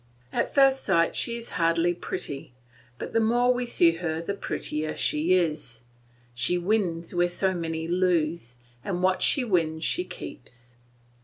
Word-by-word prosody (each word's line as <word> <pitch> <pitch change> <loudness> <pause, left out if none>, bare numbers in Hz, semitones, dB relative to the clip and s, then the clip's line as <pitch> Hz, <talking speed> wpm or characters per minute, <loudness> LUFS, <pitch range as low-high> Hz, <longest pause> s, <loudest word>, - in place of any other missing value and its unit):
At - - 0
first 270 -1 +5
sight 170 -4 +2
she 235 0 -2
is 235 - -7
hardly 165 +1 +3
pretty; 140 -6 -6 0.4
but - - -7
the 225 - +3
more 240 +3 +3
we 245 0 -2
see 170 -7 +4
her 160 -2 -2
the 170 +4 -3
prettier 155 -5 -3
she 160 +5 +2
is; 150 -9 -1 0.5
she 135 +9 0
wins 175 -3 -1
where 175 0 +2
so 190 +2 0
many 165 -2 -3
lose, 170 -7 0 0.3
and 180 -2 -3
what 185 0 +2
she 275 - +4
wins 165 -7 0
she 180 - +1
keeps. 125 -8 -10
175 Hz, 155 wpm, -26 LUFS, 160-190 Hz, 0.5 s, first